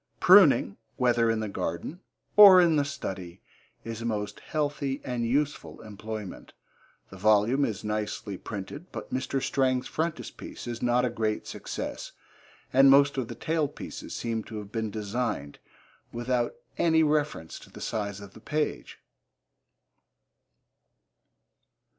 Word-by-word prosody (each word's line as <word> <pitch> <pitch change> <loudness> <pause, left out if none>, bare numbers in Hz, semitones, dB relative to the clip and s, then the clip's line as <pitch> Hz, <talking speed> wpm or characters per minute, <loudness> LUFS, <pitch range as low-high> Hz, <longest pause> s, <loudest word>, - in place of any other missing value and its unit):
Pruning, 180 - +6 0.2
whether 120 -2 +2
in 115 -1 0
the 110 - -2
garden 95 - -4 0.4
or 200 -3 +10
in 170 -3 +4
the 145 - +3
study, 95 - -6 0.4
is 115 0 -6
a - - -4
most 105 -2 -3
healthy 145 -3 -2
and 120 -2 -2
useful 145 +4 -1
employment. 110 -1 -8 0.6
The 95 - -10
volume 110 +7 +3
is 100 -3 -4
nicely 105 -1 -3
printed, 110 - -8
but - - -7
Mr. 130 +1 -1
Strang's 130 -1 0
frontispiece 160 0 -5
is 120 -1 -5
not 125 +1 +2
a 120 - -1
great 110 -2 -2
success, - - -6 0.6
and 135 +1 +7
most 140 +1 +6
of 125 - -3
the - - -7
tail 160 -2 0
pieces - - -8
seem 115 -2 -2
to 110 - -8
have 105 -1 -8
been 110 -1 -2
designed 105 - -3 0.5
without 120 0 -1 0.2
any 160 -1 +4
reference 150 - -1
to - - -15
the - - -12
size 100 -2 -3
of 100 -1 -11
the - - -13
page. 150 +4 -3
120 Hz, 135 wpm, -27 LUFS, 105-140 Hz, 0.6 s, or